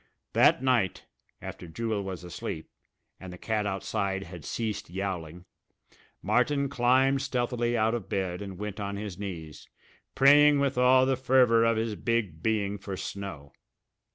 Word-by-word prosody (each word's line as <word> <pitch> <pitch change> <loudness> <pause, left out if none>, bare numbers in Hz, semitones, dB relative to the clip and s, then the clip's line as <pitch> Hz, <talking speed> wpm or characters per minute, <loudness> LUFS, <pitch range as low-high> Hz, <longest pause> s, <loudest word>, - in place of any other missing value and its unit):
That - - +4
night, 120 -8 +1 0.4
after 90 - -8
Jewel 110 +4 -2
was 95 -2 -6
asleep, 80 -2 -6 0.5
and 95 -1 -9
the 90 - -9
cat 105 +1 -1
outside 95 0 -2
had 85 -3 -10
ceased 110 0 -4
yowling, 90 -2 -5 0.8
Martin 140 -2 +1
climbed 130 +1 +3
stealthily 120 -2 -1
out 110 +1 +2
of 110 -5 -4
bed 95 -1 -2
and 95 -2 -7
went 105 +1 -5
on 100 0 -3
his 100 -3 -6
knees, 85 -7 -7 0.5
praying 145 +1 +6
with 140 -1 +1
all 130 +1 +5
the 135 0 +2
fervour 125 -3 +4
of 115 -1 +2
his 110 0 -1
big 105 -8 -2
being 105 -1 0
for 100 0 -6
snow. 95 -11 -7
105 Hz, 150 wpm, -28 LUFS, 95-125 Hz, 0.8 s, praying